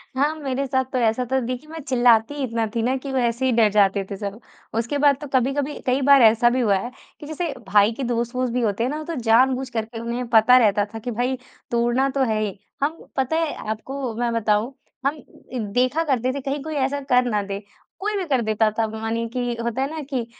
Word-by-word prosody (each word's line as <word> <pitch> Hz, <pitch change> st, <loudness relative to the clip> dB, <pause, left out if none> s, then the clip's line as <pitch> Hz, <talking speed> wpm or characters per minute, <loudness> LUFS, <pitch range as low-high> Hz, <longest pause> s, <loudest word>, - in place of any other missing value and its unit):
हाँ, 290 Hz, +3 st, +2 dB
मेरे 275 Hz, -3 st, -2 dB
साथ 260 Hz, 0 st, +1 dB
तो 260 Hz, -, -1 dB
ऐसा 230 Hz, 0 st, +2 dB
था, 265 Hz, -, +3 dB
देखिए, 255 Hz, +4 st, -5 dB
मैं 325 Hz, +1 st, -7 dB
चिल्लाती 240 Hz, -1 st, +4 dB
ही 285 Hz, -, -3 dB
इतना 230 Hz, -2 st, -1 dB
थी 230 Hz, -, +1 dB
ना 255 Hz, +3 st, +1 dB
कि 270 Hz, +1 st, -6 dB
वो 265 Hz, -, -1 dB
ऐसे 235 Hz, +1 st, 0 dB
ही 260 Hz, -, +3 dB
डर 225 Hz, -3 st, +4 dB
जाते 200 Hz, -1 st, +3 dB
थे 200 Hz, -, -4 dB
सब। 200 Hz, +1 st, -5 dB, 0.4 s
उसके 235 Hz, +5 st, -2 dB
बाद 285 Hz, -1 st, +4 dB
तो 295 Hz, -, -6 dB
कभी-कभी 275 Hz, +3 st, 0 dB
कई 255 Hz, +2 st, +1 dB
बार 275 Hz, 0 st, +6 dB
ऐसा 230 Hz, +1 st, +6 dB
भी 250 Hz, +2 st, 0 dB
हुआ 210 Hz, -4 st, +3 dB
है, 240 Hz, +6 st, -5 dB, 0.3 s
कि 295 Hz, -, -9 dB
जैसे 315 Hz, +1 st, -3 dB, 0.2 s
भाई 205 Hz, +2 st, +4 dB
के 270 Hz, -, -5 dB
दोस्त-वोस्त 240 Hz, +1 st, -1 dB
भी 250 Hz, -, 0 dB
होते 220 Hz, -1 st, 0 dB
हैं 245 Hz, -, 0 dB
ना, 305 Hz, +1 st, -4 dB
तो 335 Hz, +1 st, -5 dB
जानबूझ 255 Hz, +2 st, +3 dB
करके 225 Hz, -1 st, -4 dB
उन्हें 235 Hz, +2 st, -3 dB
पता 230 Hz, +2 st, +6 dB
रहता 205 Hz, -4 st, +3 dB
था 225 Hz, -, -5 dB
कि 245 Hz, +3 st, -5 dB
भाई 245 Hz, +3 st, -1 dB, 0.3 s
तोड़ना 240 Hz, +3 st, +2 dB
तो 275 Hz, 0 st, 0 dB
है 215 Hz, -1 st, +1 dB
ही, 205 Hz, -3 st, -3 dB, 0.3 s
हम 310 Hz, +3 st, 0 dB, 0.2 s
पता 265 Hz, +4 st, +1 dB
है 325 Hz, -2 st, 0 dB, 0.2 s
आपको 250 Hz, +3 st, -4 dB
मैं 240 Hz, -1 st, 0 dB
बताऊँ 225 Hz, +2 st, +1 dB, 0.3 s
हम 280 Hz, +2 st, +2 dB, 0.4 s
इ 250 Hz, -, -2 dB
देखा 255 Hz, +7 st, +2 dB
करते 255 Hz, -5 st, 0 dB
थे 280 Hz, -, -3 dB
कहीं 275 Hz, +2 st, -3 dB
कोई 310 Hz, 0 st, -5 dB
ऐसा 275 Hz, 0 st, 0 dB
कर 250 Hz, -1 st, +5 dB
ना 210 Hz, -1 st, +1 dB
दे, 200 Hz, 0 st, -5 dB, 0.4 s
कोई 420 Hz, +2 st, -2 dB
भी 385 Hz, -, -1 dB
कर 265 Hz, -5 st, +2 dB
देता 220 Hz, 0 st, +2 dB
था। 225 Hz, -, +2 dB
मानिए 225 Hz, +1 st, -3 dB
कि 245 Hz, -1 st, -1 dB
होता 235 Hz, +2 st, -2 dB
है 270 Hz, -, 0 dB
ना 320 Hz, +1 st, -5 dB
कि 255 Hz, -5 st, -2 dB
250 Hz, 240 wpm, -23 LUFS, 225-275 Hz, 0.4 s, बार